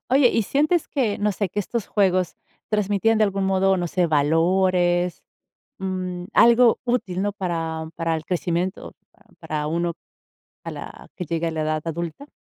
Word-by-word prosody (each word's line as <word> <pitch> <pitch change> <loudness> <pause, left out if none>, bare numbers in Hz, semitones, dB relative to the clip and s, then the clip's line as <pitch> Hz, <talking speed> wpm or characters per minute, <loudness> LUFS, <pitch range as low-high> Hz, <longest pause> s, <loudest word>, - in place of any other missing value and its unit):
Oye, 265 0 +5
¿y 230 - +1
sientes 305 - +1
que, 240 -8 0
no 210 0 +1
sé, 200 -1 -2
que 205 - -4
estos 225 +2 -3
juegos 185 -4 +1 0.3
transmitían 210 +1 +2
de 215 - +5
algún 195 -1 -1
modo, 190 0 +3
no 175 -1 -1
sé, 175 +1 +1
valores?, 175 +3 +2 0.6
mm, 185 -2 -4
algo 235 0 +5
útil, 235 -7 -1
¿no? 205 +1 0
Para 165 -5 -3
para 165 -1 -1
el 160 - -8
crecimiento, 180 +1 -2 0.5
para 150 -1 -3
uno, 170 +2 -1 0.7
a - - -5
la - - -9
que 180 - -4
llegue 165 +1 -1
a - - -2
la 160 -1 -2
edad 155 0 -1
adulta? 170 - -5
185 Hz, 165 wpm, -23 LUFS, 170-205 Hz, 0.7 s, Oye